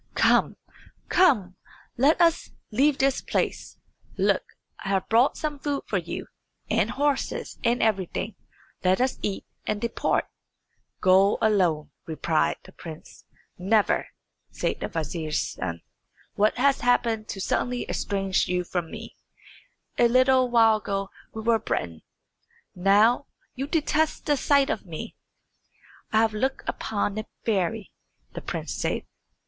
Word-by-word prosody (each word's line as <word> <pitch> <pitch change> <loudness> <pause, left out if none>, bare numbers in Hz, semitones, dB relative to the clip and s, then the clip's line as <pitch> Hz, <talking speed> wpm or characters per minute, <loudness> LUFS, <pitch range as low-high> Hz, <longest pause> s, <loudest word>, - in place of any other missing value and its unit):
"Come, - - +3 0.5
come; 215 - +3 0.4
let 280 +6 +3
us 335 -1 +3 0.2
leave 275 +6 +3
this 270 0 +2
place. - - -2 0.4
Look, - - +2 0.4
I 195 - -4
have 195 -1 0
brought 235 +4 +4
some 300 -2 -3
food 285 0 -2
for - - 0
you, - - -6 0.5
and - - +2
horses, 285 -1 -1
and 240 +1 +2
everything. 195 -5 -1 0.5
Let 185 0 +3
us 255 +1 0
eat 200 -2 -3 0.2
and 210 -1 0
depart." 235 +1 0 0.8
"Go 190 +2 +5
alone," 180 -8 +2 0.2
replied 160 0 0
the - - -14
prince. 160 -2 -11 0.3
"Never," 205 +3 +2 0.4
said - - -2
the - - -3
vizier's 155 0 -2
son. 85 -2 -5 0.5
"What 210 +1 +2
has 275 +2 +3
happened 230 -3 +1
to 195 - -5
suddenly 245 +5 -1
estrange 195 -1 0
you 180 0 0
from 175 -2 -3
me? - - -9 0.8
A 240 - +6
little 255 +1 +4
while 225 -2 +5
ago 195 -2 -3 0.2
we 220 - -6
were 230 0 +3
brethren, 85 - -3 0.7
but 180 - -12
now 215 +8 +4 0.3
you 270 +1 -4
detest 310 0 0
the 295 - +3
sight 280 0 +3
of - - -3
me." 165 -4 -7 1.0
"I 220 - +4
have 220 -1 +1
looked 265 +5 -2
upon 205 -1 -2
a 215 - -5 0.2
fairy," 210 0 -1 0.4
the - - -6
prince - - -4
said. - - -2
220 Hz, 135 wpm, -26 LUFS, 190-260 Hz, 1.0 s, A